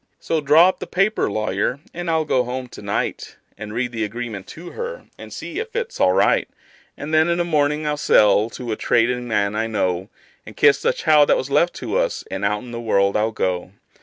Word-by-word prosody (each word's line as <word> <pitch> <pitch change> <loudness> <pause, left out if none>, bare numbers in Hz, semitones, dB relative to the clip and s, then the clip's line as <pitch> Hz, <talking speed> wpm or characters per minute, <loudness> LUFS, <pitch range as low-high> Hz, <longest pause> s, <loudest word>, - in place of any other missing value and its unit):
So 160 -2 -1
draw 150 +5 +6
up 185 - -1
the - - -6
paper, 195 - +1
lawyer, 110 +4 -1
and 175 0 -4
I'll 160 -1 +1
go 130 -4 +2
home 125 +1 -5
to - - -11
night, 100 0 -3 0.2
And 105 -1 -8
read 120 +2 -2
the 115 -2 -3
agreement 110 -2 -5
to 170 +2 -10
her, 480 +1 -6
and - - -11
see - - -6
if 455 +1 -6
it's 480 +1 -3
all - - +4
right; - - +2 0.5
And 150 +2 -6
then, 155 +1 +4
in 170 - +1
the 175 - +1
mornin', 150 -2 0
I'll 150 0 -1
sell 105 -4 +4
to 120 -1 -6
a - - 0
tradin' 120 +2 +1
man 105 -2 0
I 110 +1 -1
know, 95 -3 -1 0.3
And - - -13
kiss 140 -1 +4
the - - +2
child 150 -2 +3
that - - +5
was 130 +2 -4
left 170 +5 +2
to 475 - -2
us, - - -1
and 95 +1 -4
out 105 +1 0
in 125 - -10
the 115 0 -5
world 100 -3 +1
I'll 110 +1 +2
go. 90 -4 -3
125 Hz, 225 wpm, -21 LUFS, 105-160 Hz, 0.5 s, draw